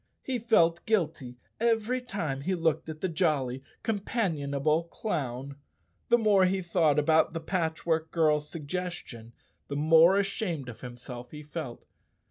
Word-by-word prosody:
He 255 -2 -2
felt 170 -7 +3
guilty 155 - 0 0.2
every 230 +2 +1
time 165 - -3
he 185 +6 0
looked 160 -2 0
at 155 0 -7
the 190 - +1
jolly, 150 -7 0 0.2
companionable 165 - 0
clown. 140 - -4 0.5
The 240 - +6
more 210 -4 +4
he 190 0 0
thought 165 -4 +2
about 160 +2 +3
the 165 - -2
Patchwork 160 -1 -1
Girl's 150 -3 +1
sugges¬ 175 +3 -3
tion, 115 -1 -11 0.3
the 140 - -4
more 165 +5 +6
ashamed 195 - -2
of 115 - -10
himself 125 0 -8
he 150 +2 -9
felt. 150 -5 -7
160 Hz, 140 wpm, -29 LUFS, 145-190 Hz, 0.5 s, The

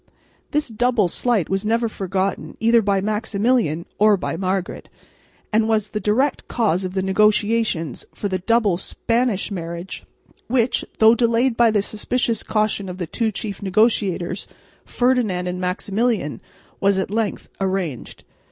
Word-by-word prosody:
This 300 0 0
double 240 -3 +1
slight 220 0 0
was 195 +1 -1
never 230 +2 +1
forgiven 195 -2 -3
either 230 +1 +4
by 200 -2 +1
Maximilian 210 -4 0
or 210 -1 +5
by 175 - -3
Margaret, 185 +1 -3 0.6
and 220 +1 +3
was 215 -2 +1
the 210 - -2
direct 230 +8 0
cause 200 -6 0
of 185 0 -5
the 190 - 0
negotiations 210 - +1
for 205 - -4
the 185 -1 -2
double 210 -2 +2
Spanish 230 +2 -1
marriage, 170 0 -6 0.4
which, 245 0 +1
though 220 +1 +7
delayed 235 +1 +2
by 235 0 +5
the 210 -2 +1
suspicious 230 +2 -1
caution 215 -3 -1
of 180 - -6
the 180 - -3
two 220 +7 -1
chief 205 -1 -6
negotiators, 195 -3 +1 0.4
Ferdinand 240 -8 +1
and 180 0 -3
Maximilian, 195 - -1 0.4
was 200 0 +2
at 190 0 -2
length 220 -1 -2
arranged. 185 -9 -3
210 Hz, 145 wpm, -21 LUFS, 190-230 Hz, 0.6 s, though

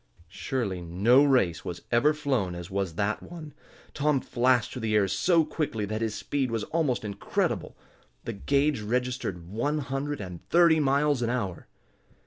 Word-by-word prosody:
Surely 100 -2 -3
no 100 +11 +4
race 125 - +2
was 85 - -6
ever 120 +6 +4
flown 135 - -1
as 85 +2 -8
was 95 -4 -2
that 105 +3 -1
one! 160 -4 -10 0.4
Tom 150 -1 +1
flashed 125 -2 +1
through 125 - -6
the 110 -2 0
air 100 -2 +4
so 160 - +3
quickly 145 -9 -2
that 110 +2 -3
his 110 -2 -1
speed 140 -3 -2
was 115 -2 -2
almost 145 -7 -1
incredible. 100 -1 -2 0.5
The 115 - -4
gage 140 +4 +1
registered 120 -6 -2
one 120 - -1
hundred 140 +1 -3
and 90 -3 -8
thirty 170 -2 +5
miles 140 -1 +2
an 120 - 0
hour! 100 -9 -3
120 Hz, 160 wpm, -27 LUFS, 100-145 Hz, 0.5 s, thirty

